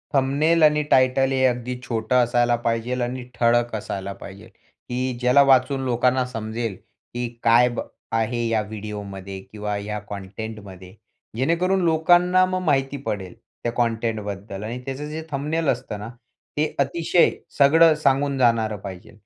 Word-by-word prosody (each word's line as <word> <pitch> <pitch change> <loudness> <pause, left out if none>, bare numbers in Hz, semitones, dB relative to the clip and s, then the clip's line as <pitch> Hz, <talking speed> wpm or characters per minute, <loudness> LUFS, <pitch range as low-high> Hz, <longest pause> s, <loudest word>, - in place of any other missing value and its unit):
Thumbnail 145 +5 +3
आणि 150 0 +5
title 130 +1 +4
हे 130 -1 +1
अगदी 125 0 -1
छोटं 115 0 -1
असायला 120 0 +2
पाहिजे 115 +1 0
आणि 125 +1 -4 0.2
ठळक 120 0 +2
असायला 100 -2 -5
पाहिजे, 100 +3 -10
की 125 +4 -6
ज्याला 125 +3 +5
वाचून 135 +1 +4
लोकांना 125 +1 +2
समजेल, 115 -3 -4 0.4
की 120 0 -2 0.2
काय 120 +1 +6
ब 120 - -5 0.3
आहे 115 +1 0
या 110 -1 +1
व्हिडिओ 105 0 -6
मध्ये 95 0 -7
किंवा 105 +1 -5
ह्या 105 +1 -4
कंटेंटमध्ये. 100 -2 -8 0.4
जेणेकरून 175 +8 +1
लोकांना 175 +3 +4
मग 185 0 -2
माहिती 140 -2 +1
पडेल 95 -4 -4 0.3
त्या 120 - 0
कंटेंटबद्दल 110 -4 -3
आणि 115 +3 -5
त्याचं 135 +2 -5
जे 155 +1 -5
थंबनेल 150 +3 -1
असतं 120 -4 -2
ना. 105 +2 -7 0.5
ते 155 +1 0
अतिशय 165 +5 +3 0.3
सगळं 160 +3 +6
सांगून 140 -1 +1
जाणारं 115 -4 +2
पाहिजे, 95 -2 -9
120 Hz, 145 wpm, -23 LUFS, 110-140 Hz, 0.5 s, काय